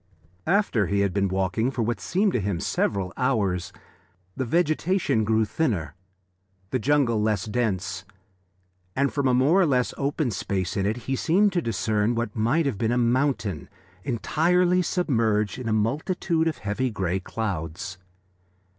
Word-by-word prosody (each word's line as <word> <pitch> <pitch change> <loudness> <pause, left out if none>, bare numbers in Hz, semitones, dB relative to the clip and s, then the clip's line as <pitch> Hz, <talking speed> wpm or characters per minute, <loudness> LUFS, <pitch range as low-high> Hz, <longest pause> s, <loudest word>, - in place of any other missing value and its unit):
After 175 - +2
he 100 0 +1
had 100 -2 +1
been 100 -1 +1
walking 95 +5 0
for 125 -3 -2
what 120 +1 -1
seemed 195 +2 +1
to - - +1
him 100 -3 -2
several 95 +1 -1
hours, 100 -9 0 0.6
the 130 - -2
vegetation 165 - +1
grew 110 +1 +2
thinner, 105 - -1 0.8
the 130 - +1
jungle 125 -3 +2
less 105 -3 0
dense, 100 -4 -2 0.9
and 140 +1 +1
from 140 -2 +1
a 130 - +3
more 150 +10 +4
or - - +4
less 125 -3 +1
open 140 -1 0
space 95 -2 -2
in 100 -1 0
it 110 +3 -1
he 135 - 0
seemed 190 +8 +2
to 175 - +1
discern 110 - 0
what 115 -3 -2
might 120 +9 +2
have 125 -8 -2
been 115 0 +1
a 120 - +1
mountain 120 - 0 0.3
entirely 175 +8 +2
submerged 115 - 0
in 120 -3 -3
a - - 0
multitude 160 - 0
of 160 - -1
heavy 105 +5 -2
grey 95 -4 -1
clouds. 95 -3 -4
115 Hz, 155 wpm, -25 LUFS, 100-145 Hz, 0.9 s, more